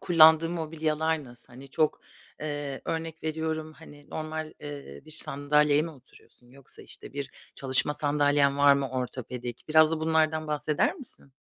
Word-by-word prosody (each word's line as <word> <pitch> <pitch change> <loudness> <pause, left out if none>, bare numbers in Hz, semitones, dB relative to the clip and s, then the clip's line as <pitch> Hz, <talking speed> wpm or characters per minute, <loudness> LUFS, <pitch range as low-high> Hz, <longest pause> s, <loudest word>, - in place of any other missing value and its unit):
kullandığın 165 0 +6
mobilyalar 160 -1 -1
nasıl? 120 -1 -15
Hani, 130 +3 -12
çok 155 +1 +1 0.4
eee, 145 -2 -4
örnek 160 0 -4
veriyorum, 160 0 -3
hani, 145 -2 -15
normal, 155 0 -4
eee, 140 - -8
bir - - -14
sandalyeye 150 0 +2
mi 165 - -4
oturuyorsun 125 -3 -19
yoksa, 135 +1 -13
işte, - - -9
bir 140 -1 -5 0.2
çalışma 135 +2 0
sandalyen 145 -1 +2
var 145 0 +7
mı 140 -1 -1
ortopedik? 125 -1 -5
Biraz 155 0 +6
da 160 - -1
bunlardan 160 -1 +1
bahseder 150 0 0
misin? 245 - -13
150 Hz, 145 wpm, -28 LUFS, 140-160 Hz, 0.4 s, var